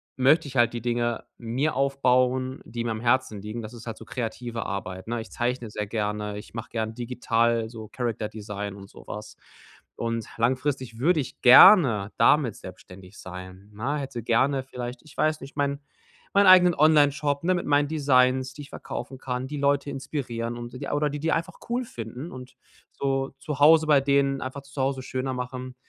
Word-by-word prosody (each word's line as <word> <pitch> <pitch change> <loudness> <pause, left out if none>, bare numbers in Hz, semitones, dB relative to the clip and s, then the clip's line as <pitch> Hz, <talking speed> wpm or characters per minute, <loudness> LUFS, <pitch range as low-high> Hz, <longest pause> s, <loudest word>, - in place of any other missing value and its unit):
möchte 140 +4 +4
ich 135 - -6
halt 120 0 +4
die 120 - -4
Dinge 120 0 -1
mir 125 +7 -1
aufbauen, 130 -1 +1
die 115 +1 -5
mir 115 - -2
am 110 - -3
Herzen 120 -3 +1
liegen. 105 +3 -6
Das 110 0 -9
ist 120 0 -11
halt 115 - -4
so - - -11
kreative 120 -1 -4
Arbeit, 95 -1 -5
ne? 120 +1 -2
Ich 110 - -12
zeichne 120 -1 -2
sehr 105 0 -4
gerne. 105 -1 -3
Ich 105 - -11
mache 115 0 -6
gern 110 -1 -3
digital 115 -1 0
so 110 -2 -9
Character-Design 105 -3 -4
und 100 -1 -12
so - - -15
was. 105 +1 -8 0.6
Und 115 -1 -3
langfristig 130 0 -1
würde 160 +5 +3
ich 130 - -9
gerne 125 - +8
damit 135 -8 +4
selbstständig 95 +1 -12
sein, 95 +2 -10
ne? 130 +8 -2
Hätte 135 -4 -5
gerne 130 +4 +2
vielleicht 125 -1 -7
ich 155 - -17
weiß 155 0 +1
nicht, 135 +1 -11
mein 140 -1 0 0.5
meinen 200 0 +5
eigenen 180 -2 +7
Onlineshop, 145 -1 +3
ne, 185 +2 +2
mit 175 - -3
meinen 145 0 +3
Designs, 130 -3 +2
die 150 - -10
ich 140 - -11
verkaufen 130 - -7
kann, 130 0 -4
die 150 +2 -5
Leute 140 0 +1
inspirieren 120 -4 -4
und 120 +1 -8 0.2
oder 145 0 +1
die 145 +1 -5
die 160 +2 0
einfach 165 - -1
cool 245 +2 0
finden 125 - -7
und 130 0 -10 0.4
so 135 -1 -2
zu 145 0 -5
Hause 160 +2 +6
bei 150 -2 +6
denen 140 0 +2
einfach 130 +2 -5
das 140 0 -19
Zuhause 135 -1 -1
schöner 130 0 -3
machen. 125 0 -6
125 Hz, 185 wpm, -26 LUFS, 115-140 Hz, 0.6 s, gerne